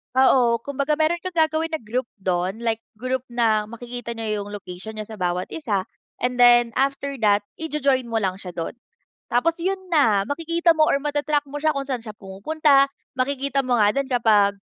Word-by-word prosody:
Oo, 250 -3 +4
kumbaga 280 +4 -2
meron 330 +2 +1
kang 370 - -3
gagawin 315 +1 +1
na 315 - -2
group 235 +4 -2 0.2
do'n, 185 +2 -1
like 230 -1 -2 0.2
group 255 0 -2
na 225 -3 +2
makikita 235 +2 -7
niyo 220 -3 -3
'yung 205 - -10
location 195 0 -8
niyo 215 - -5
sa 220 - -8
bawat 180 -2 -2
isa 210 - -2 0.3
and 250 +1 -1
then 240 -1 +5
after 275 +1 0
that 205 -1 +3
i-jo-join 280 -5 0
mo 225 - +1
lang 190 -3 -1
siya 185 -1 -9
do'n. 170 +5 -5 0.6
Tapos 310 +8 +2
'yun 380 +3 -1
na, 220 - +3
makikita 335 +2 +1
mo 310 - +4
or 280 - +2
mata-track 290 0 -1
mo 290 +1 -6
siya 310 - +4
kung 275 0 -3
saan 250 -4 -3
siya 220 - -7
pumupunta. 275 +9 +2 0.2
Makikita 275 +1 0
mo 250 -2 +1
nga 205 - +5
din 275 -1 0
kapag, 210 -4 +3
245 Hz, 185 wpm, -23 LUFS, 215-285 Hz, 0.6 s, then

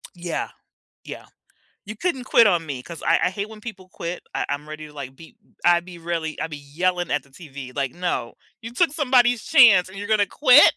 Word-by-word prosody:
Yeah, 175 -1 -3 0.6
yeah, - - -8 0.6
you 215 +1 -8
couldn't 305 - -2
quit 235 -3 +5
on 175 -5 +2
me, 140 -5 -5
'cause 170 +4 -10
I - - +3
I - - +1
hate 200 +2 -4
when 220 -1 -12
people 195 -5 -9
quit, 170 +1 -5
I - - -1
I'm 145 +1 -4
ready 155 0 -8
to 150 - -15
like 140 -3 -8
be 165 - -15 0.3
I'd 175 0 +4
be 175 -1 -11
really 165 -2 -4
I - - -1
be 155 -2 -8
yelling 175 +5 -2
at 145 - 0
the 140 - -24
TV 140 -4 -10
like, 135 -3 -1
"No, 175 -9 -3 0.3
you 230 +1 -7
took 330 +3 +2
somebody's 250 -6 +3
chance 225 - +6
and 190 +1 -11
you're 205 - -5
gonna 215 -2 +3
quit?! 270 +6 +6
175 Hz, 215 wpm, -23 LUFS, 155-220 Hz, 0.6 s, chance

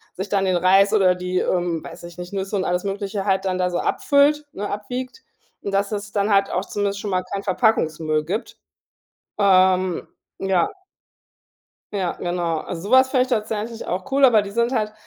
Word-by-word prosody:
sich 190 +2 -5
dann 195 -1 +1
den 185 -1 +1
Reis 195 +3 +4
oder 190 -4 +4
die, 180 0 -2
ähm, 175 -3 -1
weiß - - -10
ich 170 0 -10
nicht, 180 0 -7
Nüsse 195 0 -3
und 190 - 0
alles 180 +1 -1
Mögliche 200 0 -3
halt 190 -1 +1
dann 185 -1 -1
da 180 0 +1
so 175 - -2
abfüllt, 295 +1 +2
ne, 205 +1 -4
abwiegt. 255 - -5 0.4
Und 200 - -5
dass 200 +1 +1
es 205 -1 -5
dann 205 0 +1
halt 195 0 +3
auch 180 - -1
zumindest 200 0 -2
schon 205 - -4
mal 185 0 0
kein 195 +2 -5
Verpackungsmüll 160 -7 +1
gibt, 195 +9 -4 0.8
ähm, 185 -2 +3 0.3
ja. 195 - +2 1.2
Ja, 185 -4 -1
genau. 175 -2 -2
Also, 165 +2 -6
sowas 260 +5 +5
fände 255 -1 +3
ich 255 - -8
tatsächlich 225 -1 -3
auch 190 +9 -4
cool, 275 +1 +2
aber 230 -5 +5
die 200 - -7
sind 235 +3 +1
halt 215 -4 -1
195 Hz, 190 wpm, -22 LUFS, 185-215 Hz, 1.2 s, sowas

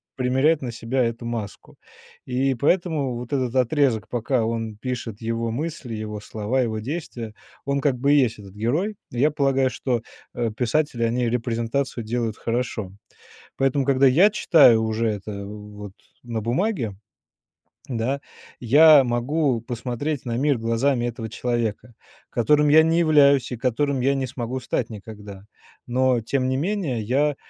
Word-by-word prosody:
Примеряет 135 +5 +2
на 125 -2 -4
себя 120 +2 -1
эту 115 +1 -4
маску. 115 -4 -6 0.5
И 130 +2 0
поэтому 145 -2 0
вот 120 +2 -7
этот 130 -2 -1
отрезок, 130 -3 +1
пока 120 0 0
он 115 -1 -3
пишет, 115 -3 -5
его 115 0 -2
мысли, 140 -2 -4
его 105 -1 -5
слова, 110 +5 -2
его 110 -3 -1
действия, 120 -4 -5 0.3
он 140 0 0
как 135 -3 +1
бы 140 +3 +2
и - - +5
есть 115 -5 +1
этот 100 -1 -12
герой. 155 - -1
Я 135 +5 +2
полагаю, 135 -3 +2
что, 125 -2 -2 0.3
э, 120 -2 -1
писатели, 125 0 0
они 120 +1 +1
репрезентацию 115 +1 -2
делают 115 -1 -2
хорошо. 115 -4 -3 0.7
Поэтому, 135 0 +1
когда 135 0 +4
я 170 +11 +6
читаю 140 - +5
уже 110 +1 0
это 105 -1 -4
в 105 0 -9
вот 100 -2 -8 0.3
на 115 -2 -4
бумаге, 120 - -1 0.9
да, 130 +2 -2 0.4
я 145 +4 +7
могу 125 +2 0
посмотреть 125 +4 -4
на 120 -1 -2
мир 140 -1 +1
глазами 120 +3 0
этого 115 -1 -5
человека, 120 0 -3 0.4
которым 150 +5 +3
я 155 +2 +7
не 165 +1 +2
являюсь, 140 -5 +4
и - - -3
которым 135 +3 0
я 135 +2 +2
не 135 -1 -1
смогу 125 0 -4
стать 120 -1 -2
никогда. 105 -2 -10 0.4
Но 125 0 +2
тем 130 +3 -1
не 130 - 0
менее 160 - -1
я, 140 +5 +1
125 Hz, 155 wpm, -23 LUFS, 115-140 Hz, 0.9 s, я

